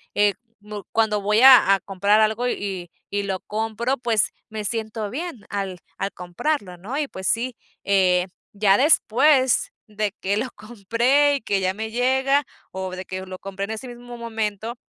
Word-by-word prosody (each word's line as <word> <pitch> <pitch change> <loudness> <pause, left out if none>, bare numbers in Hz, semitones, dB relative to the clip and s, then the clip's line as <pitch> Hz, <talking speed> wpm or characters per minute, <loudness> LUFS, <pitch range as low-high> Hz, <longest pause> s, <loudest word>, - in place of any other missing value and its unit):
eh, 205 -1 +4 0.3
mu 210 0 -8
cuando 215 -2 +2
voy 210 +3 +2
a 255 -7 +8
a - - -4
comprar 200 +3 +2
algo 220 +3 +1
y 190 -7 -3 0.2
y 205 0 -1
lo 190 -1 -2
compro, 225 +4 -2
pues 230 -4 +1 0.2
me 215 -1 -5
siento 220 0 -3
bien 280 - -6
al 195 -3 -4 0.2
al 195 +1 -2
comprarlo, 180 - -3
¿no? 215 +10 -5
Y 300 -1 -1
pues 190 0 -5
sí, 240 +2 0 0.3
eh, 185 -2 +3 0.3
ya 200 -1 +4
después 265 -2 +4 0.2
de 210 -1 -2
que 195 +2 0
lo 245 +4 -2
compré, 240 +7 +2
y 275 - -3
que 200 -2 0
ya 185 0 0
me 220 +2 -5
llega, 265 +4 +2 0.3
o 190 0 -4
de 185 - -6
que 185 0 -6
lo 185 0 -8
compré 195 0 -5
en 210 - -7
ese 220 +4 -6
mismo 245 0 -10
momento, 225 0 -4
215 Hz, 175 wpm, -23 LUFS, 195-240 Hz, 0.3 s, a